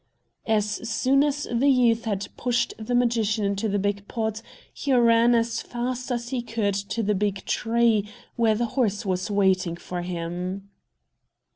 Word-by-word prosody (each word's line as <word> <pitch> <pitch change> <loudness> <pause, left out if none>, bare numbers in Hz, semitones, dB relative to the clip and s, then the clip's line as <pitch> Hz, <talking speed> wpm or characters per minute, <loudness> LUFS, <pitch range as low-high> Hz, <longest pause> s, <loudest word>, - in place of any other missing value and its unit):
As 215 -2 +2 0.2
soon 265 +4 +3
as 290 0 -1
the 260 +4 +3
youth 235 -3 +3
had 200 -2 -2
pushed 245 -1 0
the 220 +3 -2
magician 230 -3 +1
into 200 +2 -1
the 205 - 0
big 200 0 -2
pot, 220 -2 -3 0.3
he 280 - -3
ran 235 -1 +5
as 230 0 0
fast 250 +1 -4
as 240 -1 -2
he 255 -2 -2
could 220 -3 -1
to 200 +3 -2
the 210 +1 +1
big 200 -1 -1
tree, 225 -3 +1 0.3
where 225 -2 +3
the 240 +2 0
horse 220 -6 0
was 185 +1 -1
waiting 190 -4 +2
for 175 +1 -6
him. 180 +3 -5
220 Hz, 160 wpm, -25 LUFS, 200-240 Hz, 0.3 s, ran